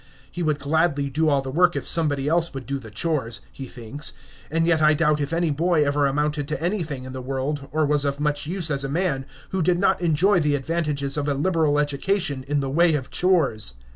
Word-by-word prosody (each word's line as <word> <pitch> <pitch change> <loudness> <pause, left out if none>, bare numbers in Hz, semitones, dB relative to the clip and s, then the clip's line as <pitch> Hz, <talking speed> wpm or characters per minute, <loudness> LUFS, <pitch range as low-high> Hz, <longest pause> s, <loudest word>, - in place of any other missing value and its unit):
He 175 - -5
would 155 -3 +1
gladly 145 -1 0
do 155 +3 +1
all 140 -2 +2
the 135 - -5
work 175 +4 +3
if - - -3
somebody 145 -4 +1
else 165 0 +2
would 135 -2 -6
do 140 0 -3
the 115 -4 -11
chores, 120 -1 -1
he 135 - -8
thinks, 125 +5 -5 0.4
and 165 +1 +1
yet 165 -2 +2
I 150 0 +5
doubt 150 -1 +2
if 145 +1 -2
any 165 -1 +1
boy 160 +1 +2
ever 145 0 +2
amounted 150 +1 -1
to 150 - -3
anything 165 -7 -2
in 130 0 -8
the 130 - -5
world, 135 +2 -3
or 155 0 +1
was 145 0 +2
of 140 0 -2
much 150 0 -1
use 170 -2 0
as 140 -1 0
a 135 - -3
man, 150 -4 -1 0.2
who 190 - -1
did 175 +2 +2
not 185 -1 +2
enjoy 175 +4 +3
the 150 -2 +1
advantages 145 -1 -1
of 145 0 -1
a 145 - 0
liberal 155 -1 +1
education 145 0 0
in 145 0 0
the 135 - -2
way 165 +2 +3
of 135 -3 -4
chores. 140 - +2
150 Hz, 230 wpm, -23 LUFS, 140-165 Hz, 0.4 s, I